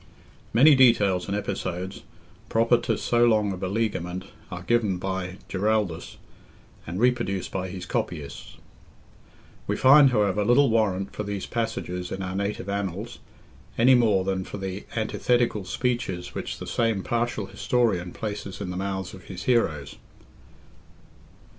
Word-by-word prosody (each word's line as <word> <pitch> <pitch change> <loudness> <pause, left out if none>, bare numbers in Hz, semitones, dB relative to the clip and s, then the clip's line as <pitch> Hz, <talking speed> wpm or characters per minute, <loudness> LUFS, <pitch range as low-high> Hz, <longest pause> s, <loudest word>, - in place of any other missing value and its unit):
Many 140 +7 +7
details 105 -9 +4
and 100 +1 -1
episodes, 95 -2 -4 0.5
proper 115 +1 +3
to - - -1
so 120 0 +2
long 110 -3 +3
a - - -4
beleaguerment, 95 -2 -2 0.3
are 85 - -7
given 110 -4 +1
by 95 0 -4
Giraldus, 100 -4 -1 0.7
and 85 +3 -4
reproduced 120 -6 +1
by 95 -1 -3
his 90 -1 -6
copyists. 75 -6 -4 1.1
We - - 0
find, 135 +1 +7
however, 105 -4 +2
little 120 +4 +4
warrant 100 -4 +1
for - - -4
these 100 -2 -4
passages 90 -6 -3
in 95 - -4
our 95 0 -4
native 100 0 -2
annals, 100 +3 -4 0.6
any 125 +3 +6
more 110 -6 +4
than 95 0 -1
for 105 - -7
the 95 0 -5
antithetical 115 -1 +1
speeches 95 -3 -2
which - - -4
the - - -7
same 115 -5 0
partial 120 +1 -1
historian 105 -8 0
places 105 -2 -5
in 95 -3 -4
the 90 - -4
mouths 95 -1 -3
of 95 - -12
his 90 -2 -7
heroes. 80 - 0
100 Hz, 140 wpm, -25 LUFS, 95-115 Hz, 1.1 s, Many